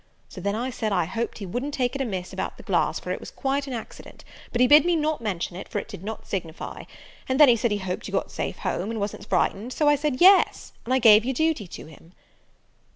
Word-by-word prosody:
So - - -9
then 200 +1 -1
I 245 +4 -2
said, 220 -3 -3
I 195 - +1
hoped 225 +7 -4
he 205 - -6
wouldn't 250 +10 -4
take 250 -2 0
it 275 - -3
amiss 190 -8 -4
about - - -4
the - - -12
glass, - - 0
for - - -6
it - - -2
was - - -9
quite 275 +1 -2
an 265 - -5
accident; 230 - -9 0.3
but 240 - -2
he 250 - +6
bid 290 +3 +7
me 350 0 +2
not 310 -3 -1
mention 185 -5 -3
it, 185 - -8
for 215 - -4
it - - -3
did 170 - -10
not 220 +2 -6
signify. 170 -4 -5 0.4
And 260 +2 0
then 295 -3 +9
he 240 - +6
said 235 +1 0
he 205 - 0
hoped 190 -2 -4
you - - -8
got - - -2
safe - - -4
home, 190 +5 -3
and 225 -1 -3
wasn't 200 0 -4
frightened 225 +6 0
so 300 - +1
I 295 - +6
said 290 -2 -2
yes, 380 +2 +5
and 255 - -1
I - - +4
gave 220 -4 +7
your 260 +2 -2
duty 315 - 0
to - - -9
him." 160 +2 -16
235 Hz, 260 wpm, -25 LUFS, 200-275 Hz, 0.4 s, then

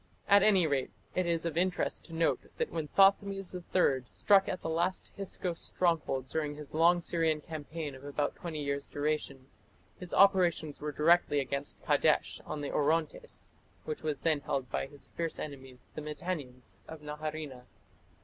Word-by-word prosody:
At 200 0 +7
any 195 -4 +5
rate 140 -4 0 0.2
it 185 -1 0
is 170 -1 0
of 165 -2 -2
interest 180 +1 0
to 165 - -10
note 165 0 +1
that 475 - -1
when 160 -2 -3
Thothmes 195 +2 +3
III 175 -7 +1
struck 195 -2 +4
at 185 - -3
the - - -4
last 170 +3 -1
Hyksos 180 -3 -3
stronghold 160 -7 0
during 150 0 -2
his 150 -1 -10
long 170 +2 +5
Syrian 165 -2 +1
campaign 155 -1 -6
of 130 +1 -12
about 145 0 -2
twenty 160 -5 -5
years' 140 0 -2
duration, 145 -3 -2 0.5
his 180 -2 -8
operations 180 -6 +3
were 150 0 -2
directly 150 0 +4
against 140 +1 -4
Kadesh - - +2
on 150 - -4
the 145 - -3
Orontes, 155 +1 -1 0.3
which 155 - -4
was 155 -2 -1
then 160 -3 +2
held 135 -4 -3
by - - -1
his 145 0 -10
fierce 165 -1 -3
enemies 135 -4 -8
the - - -5
Mitannians 145 - -5
of 160 -1 -9
Naharina. 150 -3 -5
155 Hz, 165 wpm, -31 LUFS, 145-175 Hz, 0.5 s, At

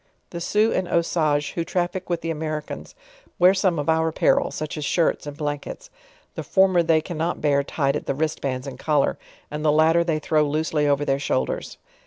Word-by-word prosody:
The 170 - -6
Sioux 215 +5 +2
and 180 - -1
Usages, 155 -4 +1
who 170 - -2
traffic 180 +2 -2
with. 175 - -1
the 165 - -2
Americans, 155 - -5 0.4
wear 180 +1 +6
some 185 -3 +1
of 145 - -3
our 160 0 +2
apparel, 160 - +2
such 155 -1 -5
as 150 - -4
shirts 165 0 0
and 145 0 -7
blankets; 145 -2 -5 0.4
the - - -5
former 190 -2 +3
they 160 -1 +3
cannot 165 +1 -3
bear 140 -2 +2
tied 140 -1 -1
at - - -4
the 140 - 0
wristbands 140 -3 -2
and 130 -2 -8
collar, 150 -2 +1 0.3
and 150 0 -4
the 155 - +4
latter 160 +2 +4
they 165 -2 0
throw 155 0 +1
loosely 150 0 0
over 145 0 +1
their 135 0 +1
shoul 65 - 0
ders. - - -6
155 Hz, 200 wpm, -23 LUFS, 145-170 Hz, 0.4 s, wear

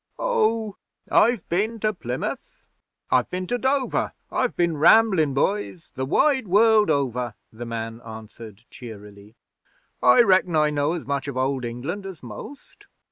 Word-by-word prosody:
'Oh, 220 - 0 0.3
I've 235 -4 +3
bin 215 +6 -1
to 215 0 +1
Plymouth, 125 -9 -6 0.5
I've 125 -1 +2
bin 185 0 -4
to 245 +6 -2
Dover 265 0 0 0.2
I've 255 -2 -1
bin 170 -3 0
ramblin', 170 -4 +4
boys, 185 +1 -2
the 130 +1 -4
wide 265 - +2
world 215 +2 +4
over,' 125 -4 -1 0.2
the 120 +2 -8
man 115 0 -5
answered 110 -1 -11
cheerily. 105 -3 -12 0.7
'I 125 - +6
reckon 185 -4 +3
I 150 -1 +3
know 145 +2 0
as 175 - -5
much 140 0 -3
of 140 -2 -5
Old 130 -1 -1
England 145 +12 -5
as 185 -8 -10
most.' 125 - -11
155 Hz, 145 wpm, -23 LUFS, -, 0.7 s, I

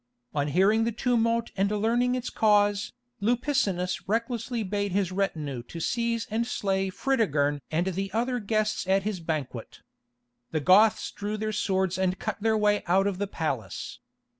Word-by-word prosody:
On 145 -1 0
hearing 195 +9 +3
the 230 - 0
tumult 230 -1 +1
and 195 +1 +1
learning 235 +4 +1
its 250 -1 -4
cause, 205 -1 +3 0.3
Lupicinus 210 -6 0
recklessly 230 +2 -1
bade 200 0 -2
his 190 -2 +1
retinue 155 -9 -2 0.2
seize 230 +5 -1
and 230 +2 0
slay 195 -4 0
Fritigern 155 - +1
and 165 +3 0
the 190 +1 -2
other 245 +4 0
guests 215 -2 -1
at 195 0 +3
his 205 -3 -2
banquet. 150 -8 -5 0.7
The 155 - -1
Goths 195 +7 +4
drew 210 +1 -4
their 215 0 -2
swords 190 -3 0
and 185 0 +1
cut - - -4
their 220 0 +2
way 210 -1 +2
out 190 +3 +3
of 195 -2 -1
the 205 - -1
palace. 135 - -4
205 Hz, 155 wpm, -27 LUFS, 185-225 Hz, 0.7 s, Goths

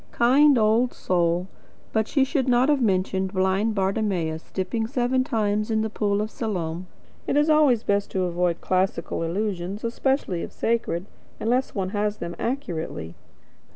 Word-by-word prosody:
Kind 270 +4 +5
old 225 +3 +2
soul! 175 0 0 0.5
But 220 0 +1
she 275 - +2
should 265 -1 0
not 250 +2 +4
have 290 -3 +3
mentioned 190 -2 0
blind 190 +3 +1
Bartimaeus 190 -5 -1
dipping 220 +4 -2
seven 255 +1 +1
times 215 -3 0
in 220 -1 +1
the 220 - -3
pool 205 -2 0
of 215 +1 -3
Siloam. 180 -5 -3 0.4
It 285 - +1
is 295 +2 +4
always 290 -7 +4
best 200 0 0
to 190 - -1
avoid 175 -1 0
classical 185 -3 -1
allusions, 190 +2 -3
especially 235 -6 -1
if - - -6
sacred, 225 -6 -1 0.3
unless 250 +4 0
one 190 -2 -1
has 210 +1 -1
them 170 0 -5
accurately. 170 - -4
210 Hz, 155 wpm, -24 LUFS, 185-240 Hz, 0.5 s, Kind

